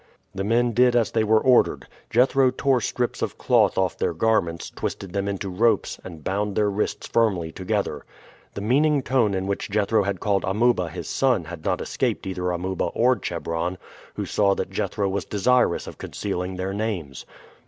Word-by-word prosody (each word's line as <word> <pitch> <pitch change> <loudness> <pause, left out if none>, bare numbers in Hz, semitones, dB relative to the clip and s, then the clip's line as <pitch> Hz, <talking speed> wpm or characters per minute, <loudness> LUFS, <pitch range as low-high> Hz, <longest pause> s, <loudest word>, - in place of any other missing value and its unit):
The 95 - -3
men 120 +3 +2
did 125 +2 +4
as 115 -2 +2
they 110 - +1
were 110 0 +4
ordered. 125 +1 +3 0.2
Jethro 130 +3 +4
tore 130 0 +1
strips 120 +2 -2
of - - -3
cloth - - +3
off 95 -2 0
their 85 - 0
garments, 85 -4 0
twisted 95 -2 -5
them 100 0 -1
into 100 0 -3
ropes, 110 +6 +1
and 80 -4 -10
bound 100 +1 -1
their 105 -1 +2
wrists 105 +2 -2
firmly 95 -8 +1
together. 95 -5 -2 0.5
The 100 - -4
meaning 140 +6 +2
tone 120 -7 +2
in 95 0 -2
which 100 +2 -3
Jethro 105 +2 +2
had 100 -2 -2
called 100 0 0
Amuba 100 -2 +1
his 80 - -7
son 125 -9 +1
had 80 -1 -9
not - - 0
escaped - - -2
either 90 -1 -2
Amuba 90 +1 -2
or 125 +2 +2
Chebron, 85 -2 -3 0.4
who - - -3
saw 100 -2 +2
that - - -4
Jethro 100 - -1
was 95 +1 -2
desirous 120 -1 +2
of - - -10
concealing 95 -2 -4
their 95 +1 -3
names. 100 - -4
100 Hz, 180 wpm, -24 LUFS, 95-115 Hz, 0.5 s, did